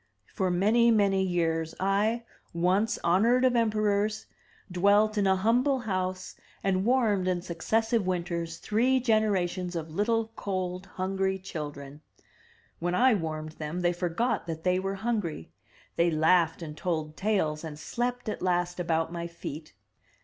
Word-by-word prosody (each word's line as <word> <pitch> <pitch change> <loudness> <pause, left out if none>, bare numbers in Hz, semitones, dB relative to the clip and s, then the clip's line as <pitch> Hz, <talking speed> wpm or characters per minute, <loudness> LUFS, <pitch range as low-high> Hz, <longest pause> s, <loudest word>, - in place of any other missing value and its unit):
For 190 -1 0
many, 215 +7 +3
many 200 -4 +3
years 165 -3 0
I, 205 +5 +1 0.3
once 185 +6 +2
honored 230 +9 +3
of 250 -1 +3
emperors, 215 -2 +1 0.5
dwelt 205 +4 +3
in 205 -2 +2
a 190 - +4
humble 245 +7 +2
house 185 -4 -3 0.3
and 190 -1 +1
warmed 220 -7 +2
in 180 -1 0
successive 220 +5 0
winters 170 -2 -2
three 250 +5 +2
generations 195 -6 0
of 160 -1 -4
little, 225 +4 0
cold, 185 -1 -3
hungry 190 +1 -1
children. 150 -6 -7 0.8
When 175 +1 -1
I 255 +4 +5
warmed 155 -4 -3
them 155 +4 -3
they 175 0 +2
forgot 175 +6 -1
that 160 -1 -5
they 180 0 +2
were 195 +1 -2
hungry; 195 - -3 0.5
they 170 +1 +4
laughed 165 +1 +2
and 150 -2 -7
told 155 -3 -3
tales, 180 -7 0
and 155 -2 -7
slept 245 +9 -3
at 215 - -3
last 175 -1 0
about 165 -1 0
my 170 0 -4
feet. 155 - -8
185 Hz, 140 wpm, -28 LUFS, 170-215 Hz, 0.8 s, I